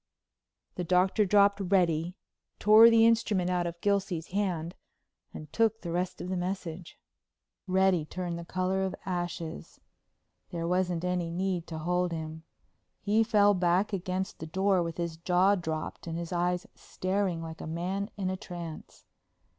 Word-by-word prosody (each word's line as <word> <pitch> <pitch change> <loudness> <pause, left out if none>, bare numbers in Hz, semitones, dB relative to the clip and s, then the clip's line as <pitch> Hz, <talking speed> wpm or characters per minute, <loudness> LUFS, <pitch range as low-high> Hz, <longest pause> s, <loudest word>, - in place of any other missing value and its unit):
The 180 - -1
Doctor 185 +4 +3
dropped 200 +1 +4
Reddy, 175 -2 +1 0.4
tore 215 +2 +8
the 225 -1 +5
instrument 215 -5 +2
out 175 -1 0
of 170 0 -6
Gilsey's 195 -5 0
hand 180 -4 -2 0.6
and 150 -1 -10
took 225 0 +2
the 170 - -5
rest 180 +1 -2
of - - -5
the 185 - -1
message. 180 -2 -5 0.7
Reddy 185 -3 +3
turned 175 +1 -4
the - - -6
color 185 +2 -1
of 190 - -2
ashes. 175 -3 -5 0.7
There 170 -1 -3
wasn't 180 -1 0
any 180 -2 -1
need 180 0 -2
to 160 - -6
hold 180 +2 0
him. 160 -1 -5 0.6
He 215 +2 +2
fell 205 -2 +4
back 185 +3 +1
against 185 0 -3
the 160 - -6
door 190 +2 +2
with 165 -1 -4
his 170 -2 -3
jaw 180 +3 +3
dropped 160 -4 -4
and 165 0 -3
his 170 0 -5
eyes 180 0 0
staring 185 -3 -2
like 160 0 -8
a - - -6
man 185 +5 -3
in 190 -2 -1
a - - -2
trance. 175 -5 -9
180 Hz, 155 wpm, -29 LUFS, 170-195 Hz, 0.7 s, tore